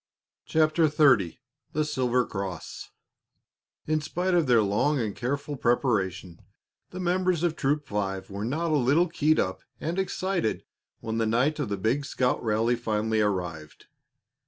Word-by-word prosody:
CHAPTER 155 +1 +3
XXX 140 - +3 0.4
THE 155 0 +1
SILVER 125 -4 +1
CROSS 95 -5 -6 1.0
In 155 0 0
spite 180 +4 -1
of 170 -4 +3
their 120 -3 +5
long 125 +9 +1
and 110 -4 -2
careful 140 +4 -3
preparation, 100 - 0 0.5
the 180 - -8
members 180 -1 +1
of 170 -2 +1
Troop 145 0 0
Five 100 -3 -3
were 100 +1 -4
not 155 +8 -1
a 155 - +3
little 145 +7 +3
keyed 155 -1 +2
up 95 - -1 0.2
and 170 +4 -2
excited 190 - -1 0.4
when 110 0 -3
the 115 - +1
night 125 +7 +1
of - - -2
the 100 - -2
big 120 +9 0
scout 125 -2 0
rally 115 +2 +1
finally 110 -1 0
arrived. 90 -7 -3
125 Hz, 150 wpm, -27 LUFS, 105-155 Hz, 1.0 s, their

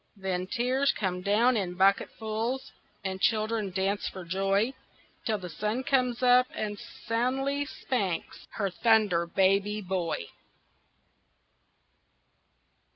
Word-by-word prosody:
Then 185 -2 -3
tears 255 +6 +1
come 180 -3 -2
down 225 +6 +3
in 185 -4 -1
bucketfuls, 220 +6 0 0.3
And 190 -1 -4
children 215 -2 +1
dance 195 +2 -1
for 185 -2 -9
joy, 195 +7 +1 0.5
Till 220 -2 +1
the 185 -3 -7
sun 215 +8 -2
comes 255 -2 +1
out 250 0 +6
and 205 -1 -3 0.3
soundly 270 +5 0
spanks 200 - -3
Her 200 -3 -1
Thunder 210 -6 +3
Baby 195 +3 +2
Boy. 185 -4 -2
210 Hz, 105 wpm, -28 LUFS, 190-240 Hz, 0.5 s, out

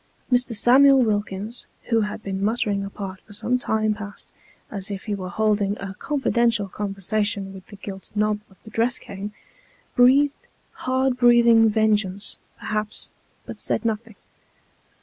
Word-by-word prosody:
Mr. 245 -1 +2
Samuel 265 +4 +6
Wilkins, 210 +1 -2 0.2
who 230 -2 +3
had 210 0 -4
been 195 0 -3
muttering 205 -2 0
apart 195 -1 -7
for 205 - -16
some 250 +4 0
time 215 -2 +1
past, 205 -1 -9 0.4
as 200 -1 -3
if 195 -1 -5
he 210 - -3
were 185 -2 -4
holding 205 +1 +1
a 195 -1 -6
confidential 235 -4 +1
conversation 200 0 -2
with 190 -1 -12
the 205 - -11
gilt 195 -1 -9
knob 210 0 +1
of 190 - -21
tho 220 - -12
dress 235 +3 +1
cane, 200 +1 -7 0.6
breathed 275 +3 +4 0.4
hard 260 0 +2
breathing 235 -2 +6
vengeance, 210 -2 0 0.2
perhaps, 215 0 -4 0.3
but - - -8
said - - 0
nothing. 225 -1 -2
215 Hz, 145 wpm, -23 LUFS, 200-235 Hz, 0.6 s, Samuel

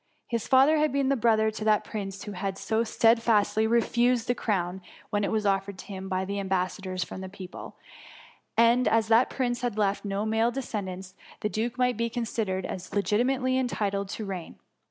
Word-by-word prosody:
His 230 -2 -2
father 270 +4 +5
had 305 0 +2
been 275 0 +1
brother 225 -4 +3
to 215 0 -6
that 215 -1 +3
prince 195 -3 -6
who 210 - -6
had 195 0 -3
so 220 +2 0
stedfastly 225 -1 +3
refused 235 +1 +2
the 245 - +3
crown 190 -5 -2 0.3
when 205 0 +1
it - - 0
was 215 -1 0
offered 195 0 0
to - - -10
him 190 -1 -7
by 190 0 -1
the 200 +1 -3
am 195 - -4
bassadors 185 0 -1
from 185 - -8
the 190 - -6
people; 185 -1 -9 0.8
and 235 +2 +5
as 225 0 +2
that 230 +3 +5
prince 245 -2 -1
had 240 -4 -2
left 200 -1 +1
no 200 +1 -2
male 225 +1 +2
descendants, 190 -7 -5 0.3
the 210 - 0
duke 230 +4 -2
might 250 -2 +1
be 235 0 0
considered 220 -5 -2
as 185 +1 -6
legitimately 255 +5 +1
entitled 200 -6 -1
to 215 - -5
reign. 185 -4 -6
215 Hz, 190 wpm, -27 LUFS, 195-235 Hz, 0.8 s, father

